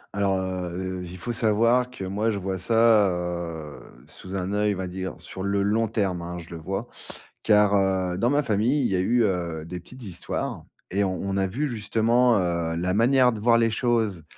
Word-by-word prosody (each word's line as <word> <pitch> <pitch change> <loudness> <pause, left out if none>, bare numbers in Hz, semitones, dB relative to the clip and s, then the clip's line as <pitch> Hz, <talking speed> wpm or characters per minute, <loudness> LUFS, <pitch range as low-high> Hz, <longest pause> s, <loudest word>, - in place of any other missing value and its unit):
Alors, 100 -1 +1
heu, 95 0 -4
heu, - - -6
il 90 +1 -8
faut 120 +7 -4
savoir 115 +3 +2
que, 125 -6 -8
moi, 105 +4 -1
je 105 - -1
vois 95 -1 -3
ça, 110 0 +4
heu, 85 -3 -4 0.3
sous 95 +5 -9
un 95 +1 -2
oeil, 105 0 +1
on - - -8
va 95 - -3
dire, 95 +1 -5
sur 95 - -9
le 100 +1 0
long 110 +2 +1
terme, 95 -5 -1
hein, 90 +1 -6
je 85 0 -10
le 85 - -6
vois, 95 +8 -4 0.6
car, 105 -1 +4
heu, 95 -2 +1
dans 115 +6 +1
ma 145 +1 +2
famille, 120 +3 +1
il 125 - +2
y 95 - +1
a - - +1
eu, 120 +6 +2
heu, 85 -5 -2
des 90 +1 -6
petites 125 +8 -14
histoires 90 -5 -4 0.3
et 100 +2 +1
on 95 -1 -2
on 100 0 -2
a 95 - +2
vu, 140 +10 -2
justement, 115 +1 +2
heu, 85 -3 -1
la 90 +2 -1
manière 125 +3 +4
de 110 - -6
voir 115 +1 +4
les 115 -1 +3
choses, 110 - 0
100 Hz, 215 wpm, -25 LUFS, 90-115 Hz, 0.6 s, ça